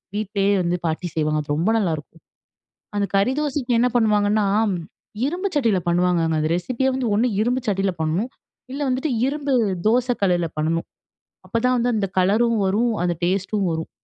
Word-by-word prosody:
வீட்லேயே 205 Hz, -1 st, 0 dB
வந்து 175 Hz, +1 st, 0 dB
பாட்டி 160 Hz, +3 st, -2 dB
செய்வாங்க. 155 Hz, -1 st, +1 dB
அது 145 Hz, -, -3 dB
ரொம்ப 170 Hz, +7 st, +1 dB
நல்லாருக்கும். 165 Hz, -3 st, -3 dB, 0.8 s
அந்த 200 Hz, -1 st, +1 dB
கறி 225 Hz, +7 st, +2 dB
தோசைக்கு 275 Hz, -4 st, -1 dB
என்ன 250 Hz, -, +4 dB
பண்ணுவாங்கன்னா, 210 Hz, -2 st, +2 dB, 0.8 s
இரும்பு 360 Hz, +7 st, -2 dB
சட்டியில 230 Hz, -9 st, +2 dB
பண்ணுவாங்கங்க. 170 Hz, -2 st, +2 dB
அந்த 155 Hz, -, 0 dB
ரெசிப்பியே 255 Hz, +8 st, -1 dB
வந்து 260 Hz, -2 st, -1 dB
ஒரு 230 Hz, +4 st, +2 dB
இரும்பு 250 Hz, +3 st, 0 dB
சட்டியில 195 Hz, -1 st, +1 dB
பண்ணும். 165 Hz, +9 st, 0 dB, 0.4 s
இல்ல 285 Hz, -, -4 dB
வந்துட்டு 260 Hz, +4 st, -1 dB, 0.2 s
இரும்பு 285 Hz, 0 st, -2 dB, 0.3 s
தோச 245 Hz, +3 st, +3 dB
கல்லுல 175 Hz, -3 st, +2 dB
பண்ணணும். 165 Hz, +2 st, -1 dB, 0.6 s
அப்பதான் 250 Hz, +2 st, +1 dB
வந்து 240 Hz, +1 st, +1 dB
அந்த 205 Hz, -2 st, 0 dB
கலரும் 220 Hz, +5 st, +3 dB
வரும், 220 Hz, +5 st, +1 dB
அந்த 175 Hz, -1 st, +1 dB
டேஸ்ட்டும் 195 Hz, +3 st, 0 dB
வரும். 160 Hz, 0 st, -4 dB
205 Hz, 155 wpm, -22 LUFS, 175-245 Hz, 0.8 s, என்ன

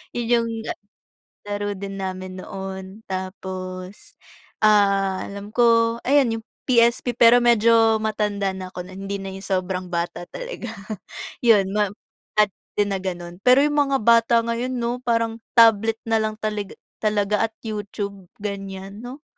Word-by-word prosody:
Yun 240 Hz, -1 st, -2 dB
yung, 235 Hz, -1 st, +2 dB, 0.2 s
ah, -, -, -3 dB, 0.7 s
laro 205 Hz, 0 st, -2 dB
din 195 Hz, 0 st, -6 dB
namin 185 Hz, 0 st, -5 dB
noon. 190 Hz, +1 st, -7 dB
Tapos, 185 Hz, 0 st, -6 dB, 0.5 s
ah, 200 Hz, -3 st, +3 dB
alam 200 Hz, +1 st, -8 dB
ko, 230 Hz, 0 st, +3 dB
ayan 260 Hz, -4 st, +3 dB
yung 225 Hz, -, -10 dB, 0.2 s
PSP 235 Hz, 0 st, +3 dB
pero 240 Hz, 0 st, +7 dB
medyo 230 Hz, -1 st, +5 dB
matanda 205 Hz, -2 st, 0 dB
na 190 Hz, -1 st, -6 dB
ako 180 Hz, -1 st, -7 dB
non 190 Hz, +2 st, -9 dB
hindi 200 Hz, -, -2 dB
na 195 Hz, -, -5 dB
yung 190 Hz, -, -7 dB, 0.2 s
sobrang 185 Hz, 0 st, -2 dB
bata 175 Hz, 0 st, -3 dB
talaga, -, -, -7 dB, 0.7 s
yun 225 Hz, -5 st, +5 dB
map 205 Hz, -1 st, 0 dB, 0.4 s
at 210 Hz, -2 st, +4 dB, 0.2 s
din 205 Hz, -1 st, +1 dB
na 195 Hz, -, -1 dB
gano'n. 175 Hz, -1 st, -6 dB
Pero 255 Hz, +6 st, +5 dB
yung 295 Hz, 0 st, +2 dB
mga 270 Hz, -4 st, 0 dB
bata 230 Hz, +1 st, +5 dB
ngayon 235 Hz, +2 st, -2 dB
'no, 240 Hz, 0 st, -2 dB
parang 230 Hz, -2 st, 0 dB, 0.2 s
tablet 225 Hz, -1 st, +6 dB
nalang 220 Hz, -1 st, 0 dB
taliga 210 Hz, -2 st, -4 dB, 0.2 s
talaga 210 Hz, 0 st, +1 dB
at 225 Hz, -, -28 dB
YouTube, 200 Hz, -3 st, -5 dB, 0.2 s
ganiyan, 195 Hz, 0 st, -6 dB
'no, 255 Hz, +5 st, -9 dB
210 Hz, 145 wpm, -23 LUFS, 195-230 Hz, 0.7 s, pero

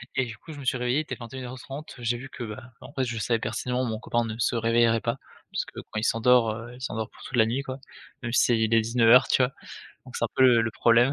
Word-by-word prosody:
Et 130 Hz, -, +2 dB
du 115 Hz, -2 st, -8 dB
coup 160 Hz, -, -12 dB
je 145 Hz, -, -10 dB
me 140 Hz, -, -8 dB
suis 130 Hz, -, +1 dB
réveillé 125 Hz, +2 st, 0 dB
il -, -, +1 dB
était 155 Hz, -, -6 dB
21:30 130 Hz, +4 st, -8 dB
j'ai 120 Hz, 0 st, -1 dB
vu 135 Hz, +3 st, -9 dB
que, 125 Hz, -, -7 dB
ben 105 Hz, +1 st, -7 dB, 0.2 s
en 140 Hz, -, -12 dB
fait 130 Hz, -3 st, 0 dB
je 120 Hz, -2 st, -4 dB
savais 115 Hz, +1 st, +1 dB
pertinemment 125 Hz, +3 st, -2 dB
mon 110 Hz, -2 st, -3 dB
copain 120 Hz, +1 st, 0 dB
ne 110 Hz, -1 st, -4 dB
se 120 Hz, -, +1 dB
réveillerait 115 Hz, 0 st, +3 dB
pas, 115 Hz, +1 st, -1 dB, 0.3 s
parce -, -, -1 dB
que -, -, -10 dB
quand 110 Hz, -, -5 dB
il -, -, -5 dB
s'endort, 115 Hz, 0 st, +4 dB
heu, 115 Hz, +2 st, -7 dB
il 125 Hz, -, -14 dB
s'endort 110 Hz, -4 st, -3 dB
pour -, -, -17 dB
toute 130 Hz, -, -4 dB
la 110 Hz, -, +6 dB
nuit 130 Hz, +5 st, -1 dB
quoi, 130 Hz, -1 st, -6 dB, 0.5 s
même 120 Hz, -1 st, -3 dB
s'il 120 Hz, -2 st, +3 dB
est 115 Hz, -, +5 dB
19:00 115 Hz, +2 st, +5 dB
tu 130 Hz, -, +4 dB
vois? 125 Hz, +2 st, 0 dB, 0.5 s
Donc -, -, -12 dB
c'est -, -, 0 dB
un -, -, 0 dB
peu -, -, +4 dB
le 120 Hz, -3 st, +6 dB
le 110 Hz, -, -1 dB
problème 120 Hz, +4 st, +4 dB
120 Hz, 275 wpm, -26 LUFS, 115-130 Hz, 0.5 s, la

